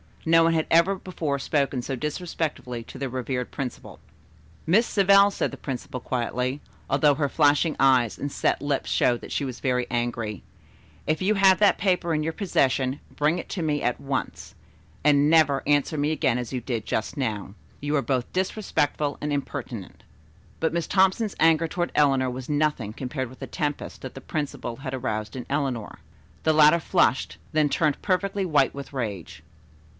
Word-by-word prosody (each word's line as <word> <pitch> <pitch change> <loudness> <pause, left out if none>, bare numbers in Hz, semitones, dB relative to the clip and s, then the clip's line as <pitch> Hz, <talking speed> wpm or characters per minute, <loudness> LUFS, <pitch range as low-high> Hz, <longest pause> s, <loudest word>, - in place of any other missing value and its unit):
No 165 0 +5
one 165 0 +3
had 160 -1 0
ever 170 +4 +4
before 165 -6 -3
spoken 140 -2 0
so 135 - -3
disrespectfully 150 -4 -4
to - - -11
their 135 -1 -2
revered 125 0 -3
principal. 130 -3 -6 0.7
"Miss 210 +8 +4
Savell," 200 -1 +5
said - - -1
the - - -9
principal 130 -1 -5
quietly, 125 +2 -2 0.3
although 145 +1 +4
her 145 -1 0
flashing 150 +2 +3
eyes 130 -4 +4
and 145 - -3
set - - 0
lips 145 -2 -1
showed 120 -1 +2
that - - -10
she 140 - -1
was 130 -2 -6
very 125 -2 0
angry, 115 -4 -2 0.6
"if 155 +2 0
you 210 +3 +2
have 195 -1 +5
that 205 -1 +4
paper 180 -4 +1
in 155 - 0
your 160 +1 -2
possession, 135 -8 0 0.2
bring 150 +4 +2
it - - -7
to 180 - -3
me 150 -2 0
at 125 - 0
once, 140 -1 -4 0.5
and 145 0 +4
never 155 -4 +4
answer 145 +2 +2
me 145 +1 +1
again 130 -6 +1
as 120 -2 -5
you 125 - -2
did 115 -3 -3
just 110 - -2
now. 105 -7 -3 0.3
You 145 +1 -1
are 140 - +2
both 130 -3 -1
disrespectful 160 -6 -1
and 150 - -2
impertinent." 130 -7 -5 0.6
But 160 - 0
Miss 170 -1 -1
Thompson's 195 +2 +2
anger 165 0 +4
toward 175 +1 -2
Eleanor 135 -3 +3
was 125 +2 -7
nothing 145 -8 0
compared 130 +1 -4
with 130 - -14
the - - -6
tempest 150 -4 -4
that 130 - -7
the 135 - -8
principal 135 -5 -4
had 135 0 -6
aroused 110 -4 -3
in 125 - -6
Eleanor. 135 -6 -2 0.4
The 160 - +3
latter 155 +2 +6
flushed, 170 -6 +1 0.2
then 155 -1 +3
turned 150 -1 +1
perfectly 195 0 0
white 145 -6 +2
with 140 0 -8
rage. 105 - -5
145 Hz, 180 wpm, -25 LUFS, 130-160 Hz, 0.7 s, latter